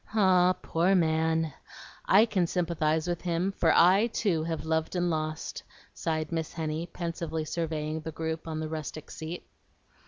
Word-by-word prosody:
Ah, 185 -3 +5
poor 175 +4 +2
man! 160 -2 +2 0.5
I 205 +4 +7
can 185 -6 +1
sympathize 160 -2 0
with 175 -1 -2
him, 175 +2 0
for 170 -4 +2
I 190 +6 +6
too 190 -8 0
have 165 -1 -3
loved 160 +2 -1
and 175 -1 +1
lost," 155 -1 -3 0.3
sighed 155 -1 -2
Miss 165 -1 -2
Henny, 160 0 -3
pensively 165 -2 -4
surveying 155 -1 -2
the 160 - -5
group 160 +1 -4
on 160 -1 -3
the 155 - -3
rustic 155 -1 -6
seat. 160 +3 -6
165 Hz, 155 wpm, -29 LUFS, 160-175 Hz, 0.5 s, I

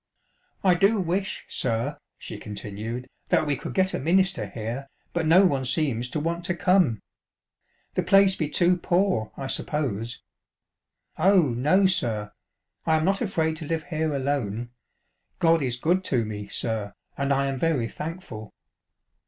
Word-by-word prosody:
" - - -41
I 185 -2 +5
do 195 +5 +3
wish, 185 +2 -2
sir," 120 +4 -1 0.2
she - - -7
continued, 110 +4 -6
" - - -43
that - - +3
we 145 -1 +1
could - - -7
get 190 0 +2
a - - -1
minister 185 +5 +2
here, 120 +5 -5 0.3
but 170 -2 0
no 180 +5 +7
one 140 -7 +1
seems 125 -3 0
to 155 - -2
want 170 +3 -2
to 175 - 0
come. 175 - +2 0.9
The - - +1
place 195 -1 +5
be 155 -5 -2
too 175 +3 +3
poor, 175 - +1
I 135 - -5
suppose. 120 -6 -1 1.0
Oh, 180 -3 +5
no, 150 +12 +3
sir, 115 - +1 0.5
I 160 - +2
am 155 0 +1
not 195 +1 +1
afraid 160 -7 0
to 155 - -4
live 160 0 -1
here 160 -2 -2
alone. 120 -5 -2 0.7
God 165 -1 +3
is 125 -3 0
good 175 +9 +1
to 120 -8 +1
me, 105 -1 -6
sir, 105 -2 -2 0.2
and 140 0 -1
I 140 0 +2
am 135 -1 -2
very 150 -7 +1
thankful." 150 - -7
155 Hz, 160 wpm, -25 LUFS, 120-180 Hz, 1.0 s, no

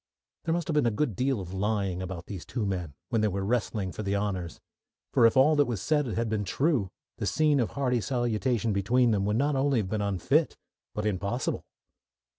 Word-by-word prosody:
There 165 - +1
must 170 -2 -2
have 160 - -1
been 150 -5 +3
a 105 -3 -1
good 135 -10 0
deal 130 0 0
of 90 -1 -7
lying 100 -2 -1
about 90 -2 -6
these 95 -5 -7
two 115 -4 -3
men 90 -7 -3
when 115 -3 +1
they 110 - +3
were 100 -1 -2
wrestling 105 -4 -1
for - - -6
the 100 -1 -1
honours, 95 -4 -2 0.5
for 115 - +7
if 115 - +1
all 150 +4 +6
that 145 - +4
was 115 -5 -2
said 150 +6 +1
had 115 0 -1
been 110 -1 -1
true 130 - +1 0.3
the 100 - -1
scene 150 +7 +3
of 120 - -1
hearty 125 -4 +1
salutation 120 -2 0
between 120 +5 +3
them 100 -2 +1
would 105 +2 +1
not 145 +3 +1
only 135 0 +2
have 100 -4 -1
been 105 0 -1
unfit, 100 -4 +1 0.4
but 105 - -2
impossible. 105 +4 -2
110 Hz, 215 wpm, -28 LUFS, 100-130 Hz, 0.5 s, for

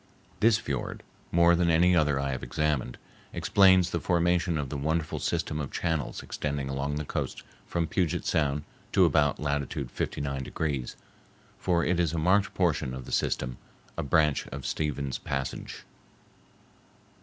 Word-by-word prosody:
This 110 +1 +5
fiord, 70 - -4 0.3
more 85 0 +5
than 85 0 +2
any 90 +2 +5
other 75 -4 +3
I 70 0 -1
have 65 - -3
examined, 70 -1 -1 0.4
explains 95 -3 +5
the - - 0
formation 85 -1 +1
of 70 -3 -3
the 75 - -4
wonderful 80 +3 -1
system 75 - -1
of 70 -3 -4
channels 80 -5 -2
extending 70 -2 -3
along 70 +2 -2
the 75 0 -3
coast - - -4 0.2
from 85 -1 0
Puget 85 0 -1
Sound 75 -1 +1 0.3
to - - +6
about 75 -1 +2
latitude 70 -3 -2
59 70 -1 -3
degrees, 70 -2 -3 0.6
for 85 -2 +1
it 90 -1 +1
is 85 -3 +1
a - - -1
marked 95 +6 +3
portion 75 -7 +1
of 65 -1 -7
the - - -9
system,—a 65 -2 -3
branch 75 0 +2
of - - -7
Stephens 70 -3 -2
Passage. 70 -1 -4
75 Hz, 150 wpm, -28 LUFS, 70-85 Hz, 0.6 s, to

